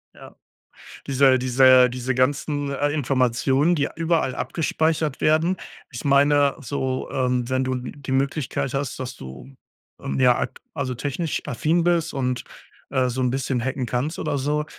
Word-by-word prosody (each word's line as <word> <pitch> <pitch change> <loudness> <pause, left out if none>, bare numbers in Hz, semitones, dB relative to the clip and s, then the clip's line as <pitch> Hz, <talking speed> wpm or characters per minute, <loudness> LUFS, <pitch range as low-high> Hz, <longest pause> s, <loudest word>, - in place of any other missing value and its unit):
Ja, - - -13 0.7
diese 135 -1 +4
diese 130 0 +5
diese 125 +1 -3
ganzen, 145 +2 0
äh, 145 +1 0
Informationen, 135 +2 +1
die 145 -2 0
überall 165 -5 +1
abgespeichert 160 -2 -1
werden 160 +4 +2 0.3
ich 120 +3 -7
meine 140 0 +4
so, 130 0 -3
ähm, 125 -1 0
wenn 130 0 +1
du 130 0 -1
die 130 +2 -7
Möglichkeit 135 -1 -1
hast, 135 -1 -3
dass 130 -1 -5
du, 65 0 -11 0.5
ähm, 70 0 -3
ja, - - +5
ak - - -4
also 130 -1 -3
technisch 145 +5 -3
affin 165 +7 0
bist 170 -2 +1
und, 125 -2 -2 0.5
äh, 130 -2 +1
so 125 +2 -4
'n 125 - +2
bisschen 130 -1 -1
hacken 130 0 -2
kannst 125 +7 -2
oder 145 - -1
so 150 +2 -1
135 Hz, 155 wpm, -23 LUFS, 125-145 Hz, 0.7 s, diese